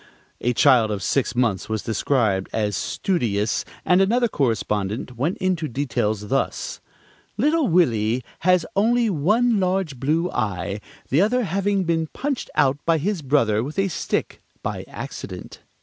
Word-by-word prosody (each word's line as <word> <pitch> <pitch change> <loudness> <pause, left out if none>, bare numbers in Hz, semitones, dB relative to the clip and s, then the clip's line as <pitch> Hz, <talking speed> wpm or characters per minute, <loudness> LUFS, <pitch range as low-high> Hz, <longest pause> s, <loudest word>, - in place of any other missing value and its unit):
A 125 - 0
child 125 -6 +5
of 105 -2 -3
six 135 -2 0
months 115 -6 0
was 110 -1 -2
described 110 -4 0
as 105 -2 -1
"studious"; 110 - -1 0.2
and 180 +1 +4
another 240 +5 +3
correspondent 110 - -1
went 145 +10 -1
into 180 -4 0
details 110 -6 -2
thus: - - -2 0.6
"Little 300 +5 +2
Willie 120 - +2 0.2
has 180 -1 +3
only 230 +2 +3
one 210 +8 +2
large 185 -7 -1
blue 160 +7 0
eye, 100 -2 -2 0.3
the 145 +6 +3
other 245 +5 +2
having 195 +1 0
been 165 -2 0
punched 275 - -3
out 135 +1 +3
by 165 -1 +3
his 185 +3 -1
brother 120 -6 +2
with 145 +7 -6
a 195 0 +2
stick, - - -2 0.2
by - - -4
accident." - - -8
145 Hz, 145 wpm, -23 LUFS, -, 0.6 s, child